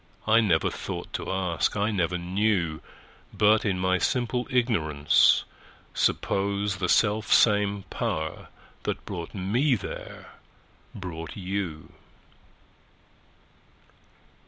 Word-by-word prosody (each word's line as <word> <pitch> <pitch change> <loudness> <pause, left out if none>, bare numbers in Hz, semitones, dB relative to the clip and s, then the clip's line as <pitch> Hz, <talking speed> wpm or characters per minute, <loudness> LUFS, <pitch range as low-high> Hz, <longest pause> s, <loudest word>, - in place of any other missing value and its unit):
I 115 +1 +5
never 85 -8 +2
thought - - -6
to - - -3
ask, 95 0 -1
I 105 +2 +1
never 90 -3 0
knew:But, 95 +3 -1
in 95 -3 +1
my 95 0 +1
simple 125 +2 0
ignorance, 80 - +3 0.5
supposeThe 100 -1 0
self 105 +1 +2
same 105 -2 +4
Power 80 0 -3 0.3
that - - -4
brought 85 +2 -6
me 120 +9 +1
there 100 - -8 0.6
brought 85 -4 -7
you. 95 -5 -4
100 Hz, 90 wpm, -26 LUFS, 85-105 Hz, 0.6 s, I